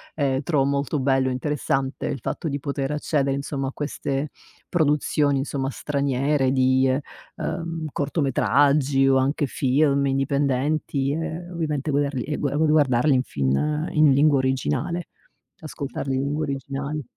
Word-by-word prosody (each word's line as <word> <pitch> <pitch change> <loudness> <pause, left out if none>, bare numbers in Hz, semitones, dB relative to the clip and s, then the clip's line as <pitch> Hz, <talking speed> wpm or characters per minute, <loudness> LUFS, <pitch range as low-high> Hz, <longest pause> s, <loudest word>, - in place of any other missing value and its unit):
ehm, 135 -3 0
trovo 145 -2 +1
molto 140 +1 0
bello 130 0 +2
e - - -1
interessante 135 0 -2
il 140 -2 -3
fatto 160 - -3
di 140 0 -3
poter 140 0 -3
accedere, 145 -2 0
insomma, 140 -1 -3
a - - -7
queste 140 0 -3 0.4
produzioni 150 -3 +1
insomma 135 -1 -2
straniere 140 0 0
di 130 0 +3
ehm 130 +1 +1 0.4
ehm, 165 -2 -4
cortometraggi 140 -1 +2
o 135 - +4
anche 140 +3 +1
film, 140 +2 +2
indipendenti 140 +1 0
e 165 +2 -4
ovviamente 155 -4 -2
guederli 140 -3 0
e 150 - -3
gua 140 -1 -1
gu 160 - +3
gu 150 - +2
guardarli 145 -2 +3
in 130 -1 +2
fin 150 - -1
in 155 -2 +5
lingua 140 +1 +4
originale, 130 - -1 0.5
ascoltarli 140 -3 -4
in 130 - 0
lingua 150 +2 -1
originale. 140 +1 -4
140 Hz, 145 wpm, -24 LUFS, 135-150 Hz, 0.5 s, in